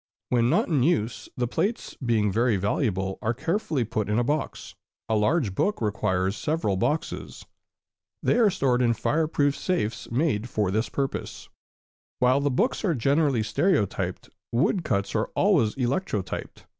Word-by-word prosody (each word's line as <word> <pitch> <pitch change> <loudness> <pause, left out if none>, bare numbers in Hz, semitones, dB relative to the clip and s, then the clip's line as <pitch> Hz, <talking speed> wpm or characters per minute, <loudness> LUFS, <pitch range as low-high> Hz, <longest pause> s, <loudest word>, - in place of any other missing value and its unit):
When 120 -1 +3
not - - +2
in 150 -7 +1
use, 125 -6 0
the 125 -1 0
plates, 215 - -2
being 110 -4 +2
very 115 +1 +2
valuable, 95 -1 -1
are 120 +1 0
carefully 160 - -1
put 110 -2 -2
in 105 - +1
a 120 - +3
box, 145 +4 -3 0.3
a 110 - +1
large 110 - +1
book 205 - 0
requiring 100 -3 0
several 110 -2 -1
boxes. 150 +11 -2 0.8
They - - +3
are 225 -3 +6
stored 135 -9 +1
in 120 -2 +3
fire 155 +7 +1
proof 145 -2 +1
safes, 110 - -2
made 120 -3 0
for 105 -5 0
this 110 +4 0
purpose. 135 -1 -4 0.7
While 125 +2 +3
books 210 - 0
are 175 -6 +1
generally 140 -1 +2
stereotyped, 100 - 0 0.2
woodcuts 115 - 0
are 110 - 0
always 170 - +3
electrotyped. 125 - -3
120 Hz, 145 wpm, -26 LUFS, 105-155 Hz, 0.8 s, are